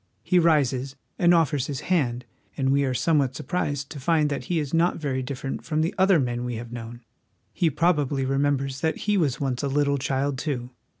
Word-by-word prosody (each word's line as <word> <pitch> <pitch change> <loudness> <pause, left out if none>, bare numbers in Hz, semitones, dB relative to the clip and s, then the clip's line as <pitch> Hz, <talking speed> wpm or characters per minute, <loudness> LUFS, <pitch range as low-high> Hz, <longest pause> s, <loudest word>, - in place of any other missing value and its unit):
He 180 - +3
rises 140 -5 +2 0.2
and 175 -1 +5
offers 150 -6 +2
his 140 -3 -4
hand, 125 -9 0 0.3
and 135 -1 +1
we 140 +1 +3
are 130 - 0
somewhat 140 -3 +1
surprised 145 -2 -3
to 145 - -7
find 155 +1 +2
that 140 - -3
he 175 - -1
is 150 -2 -2
not 170 +2 +2
very 135 -4 -2
different 135 +1 -5
from 155 -1 -1
the 165 +5 0
other 190 -2 +4
men 120 -2 -1
we 125 -1 -3
have 115 +1 -7
known. 120 0 -8 0.5
He 170 - +2
probably 145 -3 +1
remembers 135 0 0
that 160 - 0
he 210 0 +2
was 145 -10 +1
once 130 -3 -1
a 140 - -1
little 140 0 +1
child, 135 0 -1
too. 125 -5 -3
140 Hz, 200 wpm, -25 LUFS, 130-160 Hz, 0.5 s, and